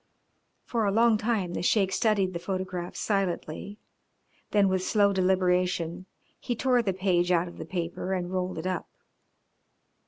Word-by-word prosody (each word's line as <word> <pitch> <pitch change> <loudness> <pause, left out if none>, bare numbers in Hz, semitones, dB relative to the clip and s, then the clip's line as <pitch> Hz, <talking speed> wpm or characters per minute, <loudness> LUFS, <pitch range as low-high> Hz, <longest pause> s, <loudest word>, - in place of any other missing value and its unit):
For 230 -2 -1
a 200 - +2
long 225 +1 +4
time 210 -6 -1
the - - -2
Sheik 195 +1 +2
studied 200 -4 +1
the 170 - -3
photographs 185 -1 -4
silently, 195 -1 -2 0.7
then 205 -2 +4
with 185 -1 +1
slow 200 +1 +3
deliberation 180 -1 +1 0.3
he 240 - -3
tore 250 +1 +2
the 205 -4 0
page 180 -2 +1
out 175 0 +2
of 175 - -11
the - - -5
paper 175 +1 -4
and 180 -1 -2
rolled 185 -1 -2
it 160 - -5
up. 185 -2 -2
185 Hz, 155 wpm, -27 LUFS, 180-205 Hz, 0.7 s, long